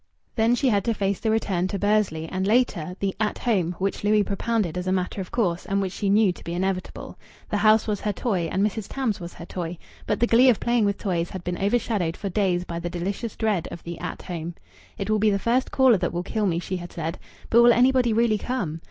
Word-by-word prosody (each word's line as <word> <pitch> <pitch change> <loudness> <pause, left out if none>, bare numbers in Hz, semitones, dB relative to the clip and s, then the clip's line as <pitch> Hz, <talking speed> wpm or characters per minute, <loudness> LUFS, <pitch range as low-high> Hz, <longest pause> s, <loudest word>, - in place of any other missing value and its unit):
Then 230 +1 +3
she 270 +2 +1
had 200 -4 +2
to 230 - +1
face 195 -2 -1
the 225 - -1
return 195 -5 0
to 200 - -3
Bursley, 205 -6 +1
and, 190 +3 -2
later, 205 -7 +1
the 195 -1 -1
At 215 -1 0
Home 185 -8 0
which 195 +2 -2
Louis 210 0 +4
propounded 200 -3 -1
as 180 0 -3
a - - +1
matter 185 +1 -1
of 185 - -7
course, 180 -7 0
and 195 0 0
which 190 -2 -2
she 200 - -1
knew 205 -1 +4
to - - -14
be 170 - -4
inevitable. 185 0 -3 0.3
The 210 - +1
house 215 +1 +4
was 210 -2 -2
her 210 - 0
toy, 185 -5 -1
and 195 +2 +2
Mrs. 215 -1 -3
Tams 255 -7 -1
was 175 -1 -8
her 170 - -9
toy. 175 -1 -5 0.3
But 210 - 0
the 240 - +4
glee 240 +3 +5
of 235 - +3
playing 235 -2 +2
with 200 -1 0
toys 175 -4 -1
had 185 -2 -7
been 175 0 -3
overshadowed 200 -5 0
for 200 - -4
days 185 -2 +1
by 170 -1 -5
the 175 0 -4
delicious 195 +6 -4
dread 210 -6 0
of 170 - -9
the 170 -1 -7
At 180 - -6
Home. 170 -1 -5 0.4
"It 195 - -3
will 215 0 +2
be 215 +1 +4
the 200 - +2
first 240 +5 +1
caller 260 -5 +5
that - - -1
will 175 +1 -3
kill 210 +2 -1
me," 170 -3 0
she 185 +2 -3
had 175 -1 -8
said. 165 0 -4 0.3
"But 235 - +7
will 240 0 +7
anybody 250 0 +4
really 220 -1 +2
come?" 190 -12 -3
200 Hz, 250 wpm, -24 LUFS, 180-220 Hz, 0.4 s, But